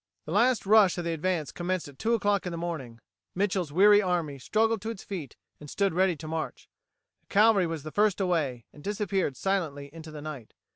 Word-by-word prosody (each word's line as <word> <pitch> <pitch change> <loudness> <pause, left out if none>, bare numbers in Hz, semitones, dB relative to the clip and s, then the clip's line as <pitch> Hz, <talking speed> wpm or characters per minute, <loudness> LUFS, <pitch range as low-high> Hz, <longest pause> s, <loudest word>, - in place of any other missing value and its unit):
The - - -6
last 245 -2 +3
rush 205 -3 +5
of 175 - -2
the 170 0 -1
advance 165 -1 -1
commenced 180 -1 -2
at 140 -2 -14
two 230 +1 +2
o'clock 205 -3 0
in - - -3
the 170 - -4
morning. 155 -9 -5 0.4
Mitchel's 185 -4 0
weary 205 +5 +6
army 170 -7 -1
struggled 220 - +1
to 220 - -4
its 225 -4 -6
feet, 170 - -6 0.2
and 150 - -11
stood 195 +2 0
ready 185 0 +2
to 155 +1 -9
march. 160 0 -4 0.5
The - - -45
cavalry 205 -3 +4
was 165 -3 -5
the 155 - -7
first 210 +1 +2
away, 155 - -1
and 145 - -14
disappeared 195 - -1
silently 155 -8 -2
into 160 -1 -10
the 150 -1 -9
night. 145 -8 -8
180 Hz, 205 wpm, -28 LUFS, 155-200 Hz, 0.5 s, weary